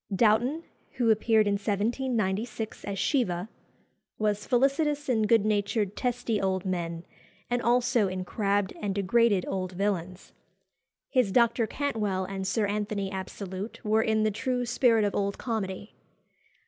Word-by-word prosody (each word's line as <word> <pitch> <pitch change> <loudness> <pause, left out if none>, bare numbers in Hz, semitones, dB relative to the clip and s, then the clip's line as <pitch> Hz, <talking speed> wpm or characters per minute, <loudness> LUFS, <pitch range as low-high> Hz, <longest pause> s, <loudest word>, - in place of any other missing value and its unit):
Dowton, 235 - +2 0.3
who 240 -4 +2
appeared 220 0 +3
in 205 - +1
1796 220 +1 -1
as 200 - -4
Sheva, 195 - 0 0.7
was 210 -1 -1
felicitous 285 +3 +1
in 220 -4 +2
good 225 -2 +4
natured 205 -1 0
testy 245 -3 -1
old 190 -1 -1
men, 170 -2 -3 0.5
and 245 0 +1
also 240 -3 +2
in 185 0 -4
crabbed 200 -1 0
and 200 -2 -2
degraded 200 0 +2
old 185 -1 -3
villains. 185 -1 -3 0.8
His 250 -7 +2
Dr. 235 0 +3
Cantwell 210 -9 -1
and 190 0 -4
Sir 210 +2 +1
Anthony 205 -1 -2
Absolute 190 +2 -6
were 215 +1 +3
in 220 -1 +1
the 215 - +2
true 245 +4 -1
spirit 235 -2 +3
of 205 - -1
old 200 0 -1
comedy. 205 -3 -4
210 Hz, 135 wpm, -28 LUFS, 195-235 Hz, 0.8 s, good